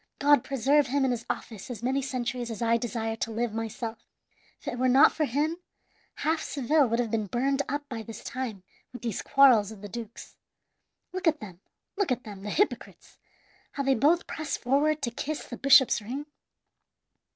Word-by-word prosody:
God 290 Hz, -3 st, +4 dB
preserve 275 Hz, +2 st, +2 dB
him 275 Hz, +2 st, +1 dB
in 260 Hz, -, +1 dB
his 235 Hz, -2 st, -4 dB
office 220 Hz, -1 st, -5 dB
as 240 Hz, -2 st, -7 dB
many 265 Hz, +3 st, +1 dB
centuries 250 Hz, -2 st, -3 dB
as 225 Hz, -3 st, -5 dB
I 230 Hz, 0 st, +2 dB
desire 225 Hz, -1 st, -2 dB
to 225 Hz, -, -2 dB
live 225 Hz, 0 st, -2 dB
myself! 225 Hz, 0 st, -4 dB, 0.6 s
If -, -, -18 dB
it 245 Hz, -, -3 dB
were 255 Hz, 0 st, +3 dB
not 265 Hz, +4 st, +7 dB
for 310 Hz, -, 0 dB
him, 295 Hz, +6 st, -1 dB, 0.6 s
half 315 Hz, +1 st, 0 dB
Seville 285 Hz, +1 st, +2 dB
would 230 Hz, 0 st, 0 dB
have 235 Hz, -3 st, -1 dB
been 215 Hz, -2 st, -1 dB
burned 270 Hz, +6 st, 0 dB
up 290 Hz, +1 st, -3 dB
by 235 Hz, -5 st, -5 dB
this 225 Hz, 0 st, -9 dB
time 235 Hz, -7 st, -5 dB, 0.3 s
with 245 Hz, -, -10 dB
these 230 Hz, -4 st, -2 dB
quarrels 245 Hz, -7 st, +5 dB
of 210 Hz, -2 st, -12 dB
the -, -, -5 dB
dukes. 230 Hz, +1 st, -9 dB, 0.8 s
Look 370 Hz, -1 st, -2 dB
at 310 Hz, -2 st, +3 dB
them, 185 Hz, -4 st, -10 dB, 0.4 s
look 395 Hz, -8 st, 0 dB
at 250 Hz, 0 st, -1 dB
them, 205 Hz, -5 st, -9 dB
the 210 Hz, -, -5 dB
hypocrites, 410 Hz, -, -2 dB, 0.5 s
how 280 Hz, -, -2 dB
they 270 Hz, 0 st, +3 dB
both 300 Hz, +8 st, +3 dB
press 310 Hz, -2 st, -4 dB
forward 285 Hz, +4 st, +1 dB
to 235 Hz, -, -1 dB
kiss 300 Hz, +6 st, -4 dB
the 245 Hz, -, -7 dB
bishop's 265 Hz, -3 st, +5 dB
ring! 260 Hz, +8 st, -5 dB
250 Hz, 190 wpm, -28 LUFS, 225-280 Hz, 0.8 s, not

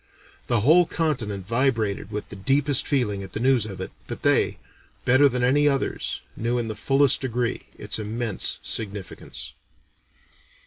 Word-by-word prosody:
The 120 Hz, -3 st, +2 dB
whole 165 Hz, +8 st, +5 dB
continent 115 Hz, -, -2 dB
vibrated 115 Hz, -3 st, 0 dB
with 105 Hz, 0 st, -5 dB
the -, -, -8 dB
deepest 135 Hz, +6 st, +2 dB
feeling 110 Hz, -8 st, 0 dB
at 95 Hz, -, -9 dB
the -, -, -3 dB
news 125 Hz, -3 st, +3 dB
of 95 Hz, -3 st, -8 dB
it, 95 Hz, -, -5 dB, 0.2 s
but -, -, -7 dB
they, -, -, +3 dB, 0.5 s
better 130 Hz, +3 st, +6 dB
than 125 Hz, -1 st, -1 dB
any 145 Hz, +4 st, +4 dB
others, 140 Hz, -2 st, -1 dB
knew 120 Hz, +2 st, -1 dB
in 115 Hz, -2 st, -2 dB
the 110 Hz, -, -4 dB
fullest 135 Hz, +2 st, +3 dB
degree 125 Hz, -2 st, -2 dB
its -, -, -2 dB
immense 110 Hz, 0 st, -2 dB
significance. 100 Hz, -4 st, -5 dB
120 Hz, 150 wpm, -24 LUFS, 105-135 Hz, 0.5 s, better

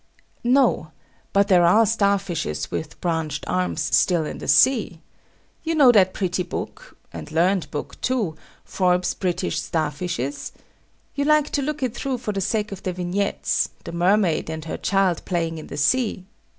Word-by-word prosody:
No. 245 Hz, -, +2 dB, 0.4 s
But 200 Hz, 0 st, +3 dB
there 180 Hz, -4 st, +5 dB
are 210 Hz, +7 st, +5 dB
star 200 Hz, -2 st, +2 dB
fishes 150 Hz, -, -4 dB
with 155 Hz, -, -5 dB
branched 160 Hz, -4 st, -2 dB
arms 180 Hz, -3 st, -1 dB
still 170 Hz, -4 st, +2 dB
in -, -, -6 dB
the -, -, -7 dB
sea. 225 Hz, -10 st, +3 dB, 0.6 s
You 325 Hz, 0 st, -1 dB
know 275 Hz, -5 st, +7 dB
that 190 Hz, -5 st, +4 dB
pretty 180 Hz, -1 st, -1 dB
book 180 Hz, -, -7 dB, 0.2 s
(and -, -, -8 dB
learned 175 Hz, +3 st, +1 dB
book, 150 Hz, -, -6 dB
too), 225 Hz, -11 st, -1 dB, 0.3 s
Forbes's 180 Hz, -1 st, +1 dB
British 180 Hz, -4 st, -2 dB
Star 155 Hz, -1 st, -1 dB
fishes? 145 Hz, -3 st, -4 dB, 0.6 s
You 280 Hz, -, -1 dB
like 305 Hz, 0 st, +3 dB
to 285 Hz, -, 0 dB
look 295 Hz, 0 st, -3 dB
it 250 Hz, -3 st, -1 dB
through 260 Hz, +1 st, -3 dB
for 235 Hz, -3 st, -4 dB
the 200 Hz, -1 st, -3 dB
sake 210 Hz, +2 st, -1 dB
of 195 Hz, -1 st, -7 dB
the 185 Hz, -, -3 dB
vignettes, 180 Hz, +3 st, -1 dB
the -, -, -7 dB
mermaid 175 Hz, -1 st, +1 dB
and 160 Hz, 0 st, -5 dB
her 160 Hz, -, -4 dB
child 195 Hz, -4 st, +1 dB
playing 165 Hz, -3 st, -2 dB
in -, -, -10 dB
the -, -, -7 dB
sea. 210 Hz, -, +1 dB
185 Hz, 170 wpm, -23 LUFS, 165-215 Hz, 0.6 s, know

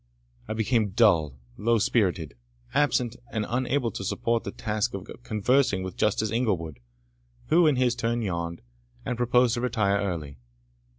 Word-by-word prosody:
I -, -, -2 dB
became 110 Hz, -1 st, +1 dB
dull, 85 Hz, -, +3 dB, 0.2 s
low 115 Hz, +2 st, +2 dB
spirited, 90 Hz, -, +1 dB, 0.4 s
absent, 125 Hz, -5 st, +1 dB
and 110 Hz, -2 st, -1 dB
unable 125 Hz, 0 st, 0 dB
to 100 Hz, -, -6 dB
support 115 Hz, +4 st, -1 dB
the -, -, -3 dB
task 105 Hz, -2 st, -2 dB
of 95 Hz, -1 st, -7 dB
conversing 110 Hz, -2 st, +1 dB
with 95 Hz, -1 st, -6 dB
Justice 105 Hz, 0 st, +1 dB
Inglewood, 90 Hz, -, -1 dB, 0.7 s
who 165 Hz, +1 st, +5 dB
in 150 Hz, -, +4 dB
his 125 Hz, -1 st, +2 dB
turn 120 Hz, -1 st, -1 dB
yawned, 85 Hz, -3 st, -3 dB, 0.4 s
and 125 Hz, -, -1 dB
proposed 120 Hz, 0 st, +3 dB
to 120 Hz, -, -1 dB
retire 105 Hz, -5 st, +1 dB
early. 75 Hz, -8 st, -4 dB
110 Hz, 150 wpm, -26 LUFS, 95-120 Hz, 0.7 s, who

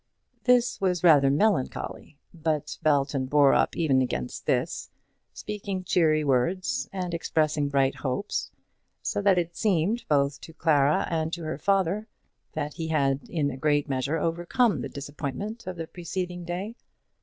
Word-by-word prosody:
This 245 Hz, -3 st, +3 dB
was 180 Hz, -3 st, +1 dB
rather 145 Hz, -5 st, +6 dB
melancholy; 150 Hz, -3 st, 0 dB, 0.2 s
but 155 Hz, -3 st, -2 dB
Belton 140 Hz, -3 st, +1 dB
bore 145 Hz, 0 st, +5 dB
up -, -, +2 dB
even 140 Hz, -6 st, +3 dB
against 65 Hz, -, -3 dB
this, -, -, 0 dB, 0.4 s
speaking 200 Hz, -3 st, -5 dB
cheery 155 Hz, -4 st, +3 dB
words 140 Hz, +2 st, 0 dB
and 180 Hz, -3 st, -4 dB
expressing 155 Hz, -3 st, 0 dB
bright 135 Hz, -1 st, +2 dB
hopes, 140 Hz, +10 st, -3 dB, 0.5 s
so -, -, -1 dB
that 195 Hz, -2 st, +4 dB
it 170 Hz, -1 st, -1 dB
seemed, 205 Hz, +2 st, +1 dB
both 140 Hz, -1 st, +2 dB
to 160 Hz, -, -11 dB
Clara 150 Hz, -3 st, +2 dB
and 160 Hz, -1 st, 0 dB
to 170 Hz, -, -4 dB
her 155 Hz, -2 st, -4 dB
father, 195 Hz, +3 st, +1 dB, 0.5 s
that 150 Hz, -1 st, -3 dB
he 165 Hz, -1 st, -4 dB
had 140 Hz, -3 st, 0 dB
in 145 Hz, -4 st, 0 dB
a 130 Hz, -, -7 dB
great 145 Hz, +1 st, +1 dB
measure 135 Hz, +3 st, -1 dB
overcome 175 Hz, -, +1 dB
the -, -, -4 dB
disappointment 145 Hz, -, -6 dB
of 185 Hz, -, -4 dB
the 165 Hz, -1 st, -5 dB
preceding 180 Hz, +1 st, -5 dB
day. 185 Hz, +6 st, -4 dB
160 Hz, 150 wpm, -27 LUFS, 140-185 Hz, 0.5 s, rather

